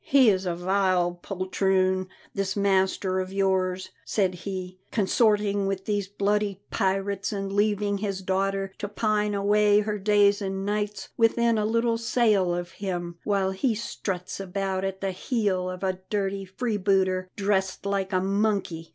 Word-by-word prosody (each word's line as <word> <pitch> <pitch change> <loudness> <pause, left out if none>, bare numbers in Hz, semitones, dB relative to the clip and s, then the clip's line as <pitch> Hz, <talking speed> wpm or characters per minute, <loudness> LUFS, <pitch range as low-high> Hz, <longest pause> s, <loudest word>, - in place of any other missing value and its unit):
"He 265 -5 +5
is 190 -1 -1
a 175 - -1
vile 180 -1 +1
poltroon, 185 0 0 0.3
this 195 -1 -1
master 190 -1 +1
of 185 0 -3
yours," 190 -1 0
said 190 -4 +1
he, 185 0 -6
"consorting 205 -1 +2
with 195 -1 -3
these 205 -2 -1
bloody 205 0 0
pirates 195 +1 0
and 195 -1 -3
leaving 205 -1 +1
his 195 -2 -3
daughter 195 +1 -1
to 205 - -3
pine 210 0 0
away 205 +1 +4
her 210 0 -2
days 205 0 +4
and 195 0 -3
nights 210 0 -2
within 230 0 +3
a 210 - +1
little 230 +1 +1
sail 220 -6 +2
of 175 0 -4
him, 175 -3 -4
while 195 -2 +1
he 220 +5 0
struts 195 -5 -4
about 195 0 -2
at 195 0 -3
the 195 -1 -1
heel 190 -3 -1
of 185 +1 -6
a 185 -1 -1
dirty 195 -1 -1
freebooter 190 -3 0
dressed 195 -2 0
like 200 -1 -1
a 185 - +2
monkey! 195 -4 -1
195 Hz, 150 wpm, -26 LUFS, 190-205 Hz, 0.3 s, He